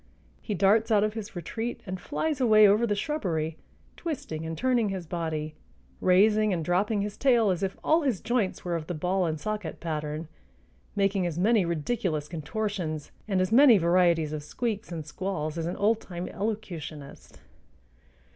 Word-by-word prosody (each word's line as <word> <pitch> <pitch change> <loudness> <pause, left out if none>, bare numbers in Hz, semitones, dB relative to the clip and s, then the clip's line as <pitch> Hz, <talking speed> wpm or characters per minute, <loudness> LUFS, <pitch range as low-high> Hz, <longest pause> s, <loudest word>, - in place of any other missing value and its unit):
He 210 - -3
darts 210 +4 +3
out 210 -2 +4
of 215 0 0
his 215 -3 -7
retreat 225 +8 -4
and 185 -2 -5
flies 300 - -2
away 215 -3 +7
over 215 +4 +3
the 205 - +1
shrubbery, 175 - -2 0.4
twisting 160 - -5
and 165 0 -4
turning 245 -4 +2
his 190 -3 -4
body, 155 -2 -3 0.5
raising 210 +3 +4
and 165 -4 -1
dropping 200 +5 +1
his 205 0 -3
tail 235 -7 +3
as 180 0 -2
if 195 -1 -2
all 320 +2 +4
his 260 - 0
joints 230 -7 -1
were 175 -1 -1
of 160 -2 -4
the 175 - -3
ball 180 +3 0
and 160 -1 -2
socket 210 +1 -4
pattern, 155 -1 -4 0.7
making 195 -2 +1
as 170 -2 -4
many 210 +1 +3
ridiculous 170 -2 -1
contortions 170 -1 -4 0.2
and 190 -3 +1
as 185 - 0
many 250 -1 +8
varieties 170 -3 +3
of 155 - -3
squeaks 215 +6 -4
and 160 -3 -5
squalls 155 -1 -3
as 165 -1 -2
an 175 - -3
old 215 +2 +2
time 175 -1 -6
elocutionist. 175 -9 -6
190 Hz, 170 wpm, -27 LUFS, 165-215 Hz, 0.7 s, many